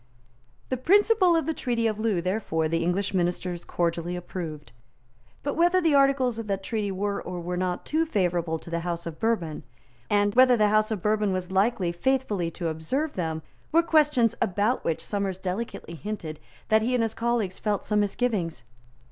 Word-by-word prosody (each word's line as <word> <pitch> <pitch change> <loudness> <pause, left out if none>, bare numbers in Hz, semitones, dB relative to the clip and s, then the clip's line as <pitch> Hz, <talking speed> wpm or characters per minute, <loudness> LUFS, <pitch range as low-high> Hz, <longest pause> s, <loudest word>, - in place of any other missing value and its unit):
The 255 - 0
principle 385 - +4
of 325 - +1
the 320 - 0
Treaty 240 -5 -1
of 215 -1 0
Loo, 215 -5 +1
therefore, 180 -4 -1
the 165 +1 0
English 190 +4 0
Ministers 175 -1 -1
cordially 170 0 -1
approved. 160 -6 -6 0.7
But 285 - -1
whether 350 +2 +4
the 330 -4 +2
articles 270 -4 +3
of 225 - -5
that 195 -1 -2
treaty 215 -1 -2
were 200 +1 -2
or 180 - -5
were 175 +1 -3
not 180 0 -2
too 320 +1 +1
favourable 175 - 0
to 170 - -11
the 170 - 0
House 170 0 -4
of 165 -2 -7
Bourbon, 195 -9 -1 0.5
and 205 0 +2
whether 255 -1 +6
the 210 -1 +4
House 215 0 +3
of 215 -5 -3
Bourbon 210 -1 +2
was 185 0 -3
likely 195 -2 +2
faithfully 205 -3 0
to 165 0 -3
observe 255 - -2
them, 160 -3 -3 0.3
were 335 +2 +5
questions 300 -8 +3
about 210 +3 +1
which 165 - -2
Somers 200 -3 -2
delicately 190 -2 -4
hinted 165 -4 -6 0.3
that 220 0 +5
he 250 +3 +1
and 240 - +2
his 225 -1 -1
colleagues 230 -6 -1
felt 210 -2 -1
some 210 -1 +1
misgivings. 205 - -1
205 Hz, 180 wpm, -26 LUFS, 175-240 Hz, 0.7 s, whether